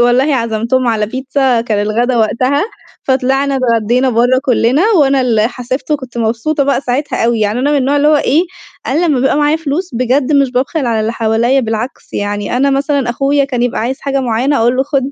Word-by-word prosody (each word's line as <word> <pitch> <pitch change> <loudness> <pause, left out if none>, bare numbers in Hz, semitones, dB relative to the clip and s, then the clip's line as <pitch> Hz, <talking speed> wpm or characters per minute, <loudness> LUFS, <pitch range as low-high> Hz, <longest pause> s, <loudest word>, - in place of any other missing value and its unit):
والله 255 +4 +2
عزمتهم 230 +2 -1
على 215 -2 0
بيتزا 260 0 0
كان 215 -3 -1
الغدا 235 +4 0
وقتها، 255 - +1 0.4
فطلعنا 270 +1 0
اتغدّينا 245 +1 +1
برّه 245 +2 +2
كلّنا 250 +3 +2 0.2
وأنا 275 -1 +3
اللي 225 -3 +1
حاسبت 255 +4 -5
وكنت 260 -5 -3
مبسوطة 235 +7 0
بقى 280 -1 +1
ساعتها 275 0 -2
أوي، 230 -1 +1
يعني 210 +2 0
أنا 280 +3 0
من 295 - +2
النوع 275 +1 +1
اللي 290 +1 +3
هو 305 - +4
إيه، 295 +3 +2 0.4
أنا 325 +6 +1
لمّا 275 -6 +1
بابقى 270 - +1
معايا 295 +1 +2
فلوس 325 +4 -3
بجد 255 +4 0
مش 280 -2 +3
بابخل 265 +3 -1
على 225 -2 0
اللي 220 +1 -1
حواليّا 230 +4 +1
بالعكس، 225 +1 -5
يعني 205 +3 -3
أنا 275 +2 +2
مثلًا 275 -2 0
أخويا 275 +3 +1
كان 250 -3 -2
يبقى 245 - -1
عايز 260 +4 -3
حاجة 275 0 -1
معيّنة 255 +3 0
أقول 240 +2 +2
له 265 - +2
خد، 275 -1 -1
255 Hz, 200 wpm, -14 LUFS, 235-275 Hz, 0.4 s, هو